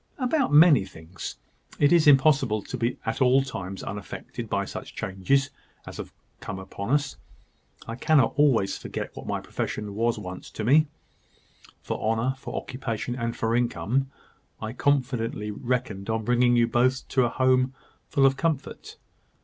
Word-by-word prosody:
"About 265 +1 +1
many 150 - +7
things. 90 -1 -8 0.4
It 145 - +4
is 170 -3 +5
impossible 135 -6 +4
to - - -6
be 120 0 -1
at 110 +3 -2
all 130 +1 +5
times 95 -7 -6
unaffected 100 0 -7
by - - 0
such - - -8
changes 115 +9 0 0.3
as - - -9
have - - -7 0.3
come 95 - -6
upon 95 +2 -7
us; 145 0 +1 0.7
I 115 - -4
cannot 130 +1 +3
always 130 -9 +3
forget - - -6
what - - -9
my - - -1
profession 105 -2 -4
once 115 +2 0
was 90 -3 -8
to 110 - -6
me, 150 +7 +5 1.0
for - - -4
honour, 115 +4 +1
for - - -7
occupation, 125 -2 -4
and 115 -1 -3
for 115 +1 0
income. 120 +2 0 0.5
I 110 0 -5
confidently 125 -6 0
reckoned 115 -3 -3
on 110 -1 -1
bringing 120 +1 +3
you 120 -1 +4
both 130 +3 +1
to 130 -2 +3
a - - 0
home 130 +1 +2 0.3
full 135 - +3
of 135 0 +4
comfort. 145 0 -3
125 Hz, 155 wpm, -26 LUFS, 110-135 Hz, 1.0 s, many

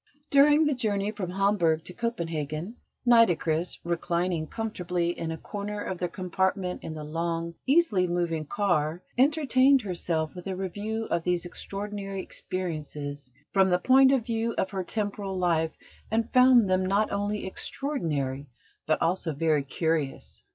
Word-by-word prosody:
During 295 +2 +6
the 295 - +2
journey 210 -5 -1
from 195 -4 -5
Hamburg 180 -4 +2
to 180 - -7
Copenhagen, 170 - -3 0.3
Nitocris, 180 -8 +3
reclining 170 -1 -1
comfortably 180 -6 -2
in 165 -2 -4
a 160 - -4
corner 205 +2 -5
of 185 - -4
their 180 - 0
compartment 185 +1 -1
in 160 - -5
the 155 - -6
long, 165 +2 -2
easily 265 - +3
moving 170 -3 -1
car, 175 -4 0 0.2
entertained 270 -2 +4
herself 170 -4 -2
with 180 +1 -8
a 190 - -2
review 205 +4 -3
of 170 -1 +1
these 180 0 0
extraordinary 195 +1 -5
experiences 150 -6 -5 0.2
from 190 -1 +4
the 180 - +4
point 265 +7 +6
of 260 -5 +2
view 230 -1 -1
of 190 - 0
her 190 -2 -2
temporal 200 -1 -3
life, 165 -3 +1 0.3
and 225 +1 -1
found 250 -4 +6
them 185 0 +2
not 200 +3 +1
only 205 +1 -2
extraordinary, 150 - -3 0.4
but 155 - +2
also 170 -2 0
very 155 -1 +2
curious. 150 0 -2
185 Hz, 145 wpm, -27 LUFS, 165-215 Hz, 0.4 s, During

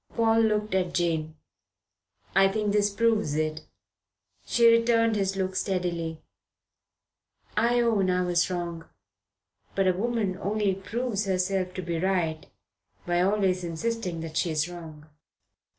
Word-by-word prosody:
Paul 225 -1 +3
looked 215 -1 +1
at 180 -2 0
Jane. 160 -3 0 1.0
"I 195 0 +6
think 210 +1 -1
this 205 0 +2
proves 215 -7 +1
it." 155 0 -2 0.8
She 235 - +2
returned 230 -1 +4
his 195 -1 0
look 190 -1 -2
steadily. 175 -4 -2 1.4
"I 235 +3 +3
own 215 -5 +2
I 180 0 +2
was 175 0 +1
wrong. 170 -2 -4 0.9
But 195 - +2
a 185 - +4
woman 205 -2 -1
only 205 0 0
proves 215 +2 -3
herself 185 -1 -1
to 185 - -4
be 170 -1 -2
right 170 -4 -1 0.6
by 175 0 +1
always 190 -1 +1
insisting 175 0 -3
that 160 -1 -5
she 175 - +1
is 155 0 0
wrong." 160 -4 -10
190 Hz, 135 wpm, -27 LUFS, 175-210 Hz, 1.4 s, I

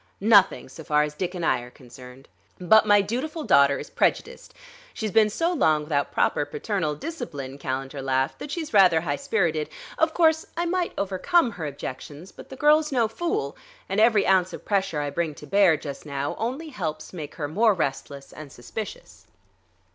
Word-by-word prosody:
Nothing, 205 -2 +4
so 145 +5 -11
far 150 0 +2
as 150 0 -4
Dick 180 +4 -4
and 175 -2 -3
I - - +2
are 120 0 -10
concerned. 125 +1 -14 0.3
But 215 +5 +5
my 205 -1 +5
dutiful 275 - -4
daughter 140 - +4
is - - -9
prejudiced; - - -1 0.4
she's 215 -2 -3
been 220 0 +4
so 335 - 0
long 155 - +2
without 145 -2 -1
proper - - +1
paternal 155 +1 -3
discipline," 145 - -7
Calendar 135 +1 -4
laughed, 135 0 -1
"that - - -7
she's 315 -3 -5
rather 180 -5 +5
high 145 -4 -2
spirited. 155 -3 -1 0.3
Of 320 0 +2
course 320 -2 +3
I 345 - 0
might 355 0 -1
overcome 215 - +1
her 165 -7 -5
objections, 145 +4 -8
but - - -13
the 265 - -8
girl's 300 +2 +3
no 240 -4 +2
fool, 345 - -3 0.3
and 195 - -1
every 220 -2 +4
ounce 185 -1 +2
of - - -9
pressure 195 -7 0
I 145 -1 -3
bring 160 0 -2
to 150 - -11
bear 180 0 +4
just 140 -2 -8
now 140 -1 -3
only 265 +8 -3
helps 160 - -5
make 155 -5 -7
her 150 -3 -3
more 210 +7 +3
restless 140 -3 -4
and 150 -2 -10
suspicious." 220 - -9
180 Hz, 185 wpm, -25 LUFS, 145-230 Hz, 0.4 s, But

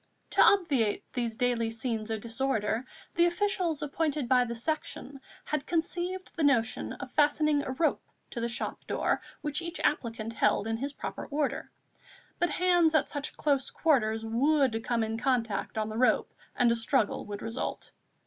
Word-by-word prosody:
To - - +4
obviate 285 - +4
these 235 -3 -1
daily 235 -1 +1
scenes 225 -1 -3
of 220 -1 -2
disorder, 230 -1 -1 0.3
the 345 +1 +4
officials 350 -4 0
appointed 295 -2 -1
by 250 -1 +4
the 235 0 -4
Section 280 +1 -3 0.2
had 300 -1 -2
conceived 355 +2 -2
the 330 - -3
notion 250 -5 +2
of 270 -3 -8
fastening 295 0 +3
a - - -5
rope 315 +4 +1 0.3
to 235 - -4
the 235 - 0
shop 230 - -4
door - - 0 0.2
which 300 +1 0
each 340 +1 -5
applicant 230 -5 -1
held 210 -2 +2
in 225 0 -1
his 275 +4 -4
proper - - -6
order; 290 -1 -2 0.7
but 350 - +2
hands 350 -3 +3
at 310 - +2
such 285 0 -3
close 280 -3 +1
quarters 225 -8 +1
would 255 0 +2
come 235 -1 0
in 220 +1 -2
contact 230 -5 0
on 215 0 0
the 220 +1 -4
rope 255 - +2 0.2
and 240 -1 +4
a - - +3
struggle 230 -2 0
would 205 -1 -6
result. 225 +2 -4
260 Hz, 170 wpm, -29 LUFS, 225-305 Hz, 0.7 s, To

